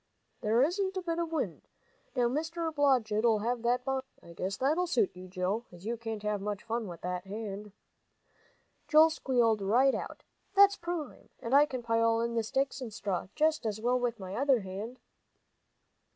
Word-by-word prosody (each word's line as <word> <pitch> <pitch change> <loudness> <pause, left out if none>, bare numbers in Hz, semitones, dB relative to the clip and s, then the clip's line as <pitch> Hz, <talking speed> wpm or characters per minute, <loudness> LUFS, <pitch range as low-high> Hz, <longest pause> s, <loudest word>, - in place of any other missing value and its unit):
"There 225 +4 +3
isn't 380 +5 0
a 375 - -2
bit 335 -1 -2
of 335 -1 -2
wind. 325 - -2 0.5
Now 245 -2 +3
Mr. 320 +5 -2
Blodgett'll 235 -6 +3
have 240 +1 -1
that 245 +1 +1
bonfire, 265 0 -2
I 170 - -12
guess; 190 +3 -3
that'll 315 +7 +1
suit 375 +3 +1
you, 185 +1 -10
Joe, 185 +5 -2
as 175 +2 -13
you 235 +2 -1
can't 225 -2 -5
have 210 -1 -1
much 205 0 -4
fun 230 -1 -2
with 170 -2 -9
that 180 +1 -4
hand." 210 0 -6 1.2
Joel 315 +1 +7
squealed 235 -7 +2
right 245 +7 +4
out. - - -5 0.3
"That's 400 0 +7
prime! 340 -6 -5
And 230 - -4
I 290 +2 +7
can 255 -4 -5
pile 230 0 +2
in 235 0 -1
the 230 - +1
sticks 265 +4 -1
and 240 -3 -5
straw 195 -4 -3
just 310 -1 +2
as 215 -1 -2
well 245 +3 +1
with 240 -2 -1
my 190 -1 -7
other 270 -2 +3
hand." 200 +6 -6
235 Hz, 180 wpm, -31 LUFS, 210-285 Hz, 1.2 s, Joel